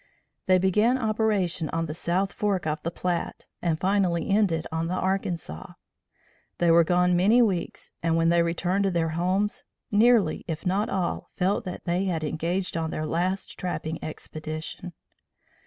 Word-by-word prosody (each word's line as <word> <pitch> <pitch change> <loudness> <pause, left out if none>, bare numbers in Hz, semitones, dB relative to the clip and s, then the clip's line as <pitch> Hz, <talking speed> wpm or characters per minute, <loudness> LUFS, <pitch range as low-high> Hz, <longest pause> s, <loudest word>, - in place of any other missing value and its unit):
They 185 0 +6
began 210 +7 +3
operation 210 - 0
on 165 0 -1
the 150 - -5
South 180 +4 -1
Fork 200 -5 -1
of 155 0 -2
the 170 - -2
Platte 175 0 -3 0.2
and 165 -3 0
finally 185 -3 +1
ended 195 -6 +2
on 160 +1 -1
the 180 - -2
Arkansas. 180 - -3 0.8
They 170 -1 +3
were 170 0 +6
gone 180 +1 +3
many 205 +7 +4
weeks 190 -6 -2
and 165 0 +1
when 165 0 +3
they 170 0 +4
returned 180 +4 0
to - - +3
their 170 -3 0
homes, 185 +5 0 0.3
nearly 215 -5 +4
if 160 -2 -5
not 195 +4 +1
all 185 -3 -2
felt 195 +4 0
that 180 - -6
they 180 +2 0
had 170 -4 -1
engaged 170 +5 -2
on 165 -1 -1
their 155 - -3
last 180 +5 -2
trapping 165 -3 -4
expedition. 155 +3 -6
175 Hz, 160 wpm, -26 LUFS, 165-195 Hz, 0.8 s, They